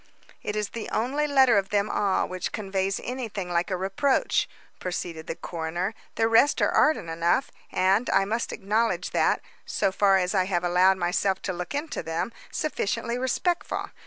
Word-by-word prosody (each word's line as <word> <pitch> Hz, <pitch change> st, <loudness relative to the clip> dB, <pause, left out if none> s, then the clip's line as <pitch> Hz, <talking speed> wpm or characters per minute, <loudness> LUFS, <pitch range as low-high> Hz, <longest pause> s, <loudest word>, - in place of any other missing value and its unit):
"It 210 Hz, -, -3 dB
is 210 Hz, -1 st, -1 dB
the 230 Hz, -2 st, -6 dB
only 275 Hz, +7 st, 0 dB
letter 265 Hz, -6 st, +5 dB
of 195 Hz, 0 st, -5 dB
them 205 Hz, 0 st, +1 dB
all 200 Hz, -2 st, +1 dB
which 185 Hz, 0 st, -4 dB
conveys 195 Hz, -2 st, -1 dB
anything 225 Hz, -8 st, -4 dB
like 175 Hz, +2 st, +1 dB
a 185 Hz, -, -1 dB
reproach," 195 Hz, +9 st, +1 dB, 0.3 s
proceeded 170 Hz, -3 st, -4 dB
the -, -, -3 dB
coroner. 175 Hz, +5 st, -3 dB, 0.2 s
"The 225 Hz, -, +2 dB
rest 225 Hz, +6 st, +4 dB
are -, -, +3 dB
ardent 305 Hz, -, +3 dB
enough 170 Hz, +9 st, +1 dB, 0.2 s
and, 195 Hz, +5 st, +2 dB
I 195 Hz, 0 st, +3 dB
must 225 Hz, +4 st, -2 dB
acknowledge 205 Hz, -2 st, 0 dB
that, -, -, +2 dB, 0.2 s
so 195 Hz, -, 0 dB
far 195 Hz, 0 st, +4 dB
as 180 Hz, 0 st, 0 dB
I 190 Hz, -2 st, +2 dB
have 180 Hz, -2 st, -1 dB
allowed 180 Hz, +2 st, +4 dB
myself 185 Hz, +2 st, 0 dB
to 185 Hz, -, -2 dB
look 180 Hz, +7 st, -5 dB
into 295 Hz, +2 st, -3 dB
them, 165 Hz, +8 st, -3 dB, 0.2 s
sufficiently 235 Hz, -4 st, -2 dB
respectful. 340 Hz, +7 st, -1 dB
195 Hz, 170 wpm, -26 LUFS, 180-230 Hz, 0.3 s, letter